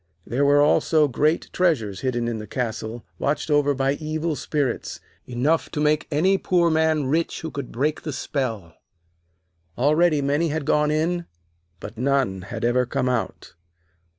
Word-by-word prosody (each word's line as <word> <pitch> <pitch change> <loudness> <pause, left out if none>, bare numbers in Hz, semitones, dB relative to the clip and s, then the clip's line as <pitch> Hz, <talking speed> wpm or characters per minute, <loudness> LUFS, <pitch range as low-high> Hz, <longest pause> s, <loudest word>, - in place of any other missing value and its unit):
There 130 +5 0
were 145 +1 +5
also 155 +1 +3
great 150 +5 0
treasures 115 - +1
hidden 120 -2 -1
in 115 -2 -3
the 105 - -8
castle, 115 -1 -4
watched 150 +2 -1
over 145 -1 +3
by 135 +1 +1
evil 155 +1 -3
spirits, 140 -4 -2 0.3
enough 135 +7 0
to 150 - -2
make 150 0 +1
any 185 +6 +2
poor 175 -2 +2
man 160 -2 +2
rich 160 +5 -1
who 160 - -5
could 140 -3 -6
break 145 +5 -1
the 155 - -4
spell. 115 - -3 1.0
Already 155 +4 +3
many 145 +4 +1
had 155 -1 -2
gone 150 +1 +2
in, 165 +3 0 0.5
but 110 +1 -9
none 130 -8 +1
had 100 +5 -5
ever 125 +1 +2
come 130 -1 -1
out. 120 -9 -3
145 Hz, 155 wpm, -23 LUFS, 125-155 Hz, 1.0 s, were